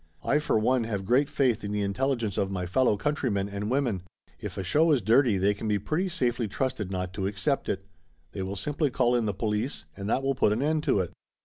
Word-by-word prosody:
I 150 - +2
for 150 - +1
one 120 +2 +2
have 100 -4 -3
great 130 +7 +3
faith 125 -7 +1
in 100 - -3
the 105 0 0
intelligence 115 0 -1
of 95 - 0
my 90 -2 -3
fellow 105 +4 +2
countrymen 115 -7 0
and 100 +1 -4
women. 125 -8 0 0.4
If - - -6
a 95 - -2
show 155 - +3
is 135 -7 +2
dirty 115 0 +4
they 100 +2 +3
can 105 +2 -5
be 105 -1 +2
pretty 155 - -1
safely 120 -9 0
trusted 105 -2 -2
not 90 -1 -3
to 95 0 -2
accept 105 +8 -1
it. 95 -1 -2 0.5
They 100 - -5
will 95 +1 -3
simply 145 - 0
call 125 -1 +2
in 120 -3 +1
the 105 - 0
police, 110 +5 -2
and 100 +1 -5
that 130 - +1
will 135 0 +1
put 115 -5 +2
an 110 - -1
end 155 +1 +1
to 100 - +3
it." 90 - -4
110 Hz, 235 wpm, -27 LUFS, 100-135 Hz, 0.5 s, dirty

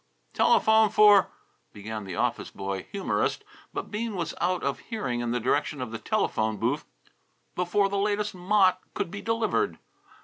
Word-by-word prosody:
"Telephone 220 0 +4
for 205 -1 +6 0.2
" - - -42
began 105 0 -6
the 95 -2 -6
office - - -1
boy 95 -1 -5
humourist, 200 -1 -1 0.3
but - - -5
Bean 220 0 -3
was 170 -2 -3
out 180 +1 0
of 140 - -1
hearing 170 - -3
in 120 0 -2
the 125 +1 0
direction 145 +4 0
of 125 -3 -4
the 115 - -5
telephone 110 - 0
booth - - -1 0.7
before 180 +3 +1
the 200 0 -2
latest 210 +1 0
mot 185 0 +3
could 170 - -2
be 200 +1 -6
delivered. 225 - 0
185 Hz, 165 wpm, -27 LUFS, -, 0.7 s, for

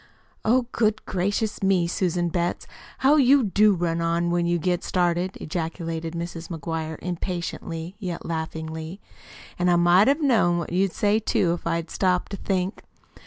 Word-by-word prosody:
"Oh, 245 +3 +3
good 220 -1 0
gracious 205 +4 -1
me, 190 -3 +3
Susan 175 0 0
Betts, 175 +1 -2 0.3
how 280 +3 +4
you 275 -1 +5
do 210 0 +4
run 170 -1 -1
on, 170 +1 0
when 175 0 +1
you 175 0 +2
get 175 +1 -1
started!" 180 +1 0
ejaculated 165 0 -4
Mrs. 170 0 -5
McGuire 160 -1 -4
impatiently, 175 -1 -4
yet 180 -5 -5
laughingly. 160 +1 -5 0.6
"An' 180 0 +2
I 175 - +5
might 175 +4 +5
have 280 +3 +3
known 215 -11 +3
what 170 - -4
you'd 185 0 +1
say, 210 +1 +2
too, 180 -5 +1
if 175 - -5
I'd 165 0 -2
stopped 180 -1 0
to 200 - -4
think. 190 0 -2
175 Hz, 160 wpm, -24 LUFS, 170-195 Hz, 0.6 s, you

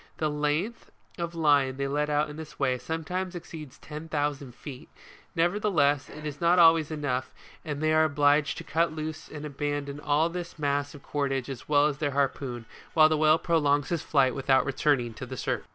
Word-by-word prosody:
The 155 -1 0
length 150 +10 -2 0.3
of 170 0 -3
line 145 -5 +3
they 140 0 -1
let 150 +2 -1
out 150 +1 +1
in 150 - -9
this 155 -1 -9
way, 130 -2 +1
sometimes 180 +5 -4
exceeds 155 -5 -9
ten 155 +1 -9
thousand 145 -4 -2
feet: 145 +1 -10 0.5
never 175 +4 +2
theless, 145 -9 +2
it 150 +1 -10
is 145 -1 -6
not 170 +1 +4
always 165 -3 +6
enough, 145 -5 -2 0.3
and 155 - -3
then - - +2
they 155 - +3
are 155 0 +5
obliged 145 0 +2
to - - -6
cut 165 +1 +1
loose 155 0 -6
and 150 -1 -7
abandon 145 0 -3
all 150 +2 +2
this 170 0 -6
mass 145 -1 -1
of 140 - -13
cordage 135 -2 -2
as 130 +1 -9
well 145 -1 +5
as 150 -2 -1
their 145 -3 -1
har 140 -1 +4
poon, 120 -4 -7 0.3
while 155 -1 +7
the 155 - +2
whale 155 +1 +5
prolongs 145 -5 +1
his 170 -3 -1
flight 135 -4 +2
without 135 -1 +2
returning 135 -3 +1
to 130 - -8
the 130 +1 -7
surface. - - -2
150 Hz, 205 wpm, -27 LUFS, 140-160 Hz, 0.5 s, while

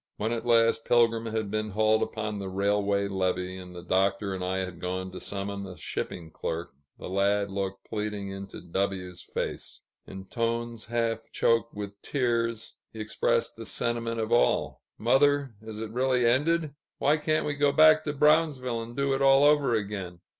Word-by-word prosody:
When 110 +2 -1
at 120 0 -3
last 115 -1 +4
Pilgrim 115 -1 +3
had 110 -2 -2
been 110 0 -1
hauled 110 +1 +2
upon 105 -1 -3
the 95 -1 -4
railway 100 +1 +1
levee, 95 -1 -1
and 90 -1 -10
the 85 - -8
Doctor 95 +2 +1
and 95 -1 -4
I 95 +1 -1
had 90 -2 -4
gone 95 +1 -3
to 90 - -7
summon 100 0 -4
a 90 -1 -10
shipping 80 -2 -5
clerk, 85 +2 -4 0.2
the - - -8
lad 100 +1 +1
looked 95 0 -4
pleadingly 105 -2 -3
into 100 0 -8
W 90 +1 -2
's 85 - -12
face. - - -5 0.3
In 95 0 -8
tones 115 +1 -2
half 115 -1 -2
choked 115 -1 +1
with 100 -1 -7
tears, 115 -4 -1
he 110 - -10
expressed 110 0 0
the - - -8
sentiment 115 -1 -2
of 110 0 -2
all: 120 - +2 0.2
"Mother, 140 +2 +3
is 110 -1 -8
it 110 -1 -5
really 125 0 +2
ended? 150 +5 +2 0.2
Why 145 +2 +3
can't 155 +1 0
we 145 - -1
go 145 0 +2
back 155 +1 +6
to 150 - -1
Brownsville, 145 -5 +2
and 115 +1 -9
do 140 0 +1
it 135 - -1
all 135 0 +6
over 145 -5 +4
again?" 100 -5 -4
110 Hz, 180 wpm, -28 LUFS, 100-120 Hz, 0.3 s, back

